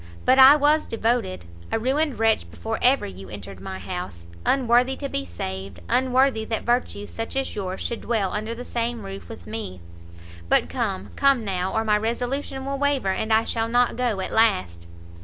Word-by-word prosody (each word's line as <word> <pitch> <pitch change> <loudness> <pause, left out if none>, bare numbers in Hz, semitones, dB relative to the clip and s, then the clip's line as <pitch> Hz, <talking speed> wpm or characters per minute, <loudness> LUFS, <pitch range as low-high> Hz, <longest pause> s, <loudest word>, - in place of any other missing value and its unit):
but 260 +1 +5
I 265 +2 +10
was 300 +1 +3
devoted, 225 - -1 0.3
a - - +2
ruined 270 +4 0
wretch 225 -1 +2
before 225 0 -4
ever 260 +3 +4
you 95 0 -9
entered 100 -2 -9
my 95 0 -6
house; 90 -2 -6 0.2
unworthy 250 0 +3
to 280 - -4
be 90 - -3
saved, 95 +1 -6
unworthy 255 -2 +2
that 225 0 -2
virtues 240 -4 -1
such 225 +2 -5
as 270 0 -1
yours 190 -2 -4
should 235 - -3
dwell 215 -5 -1
under 215 +2 -3
the 245 +1 -8
same 235 -2 -3
roof 195 0 -8
with 225 - -10
me! 215 - -6 0.7
But - - +3
come, 95 +2 -3
come 275 -5 +3
now, 185 -1 -1
or 220 - 0
my 210 -1 +2
resolution 250 +4 -2
will 275 0 -3
waver, 280 -8 +1
and 220 +3 -2
I 220 +1 +5
shall 225 -1 -1
not 245 +1 +2
go 235 -6 0
at - - -4
last." 90 - +2
225 Hz, 185 wpm, -24 LUFS, 190-255 Hz, 0.7 s, I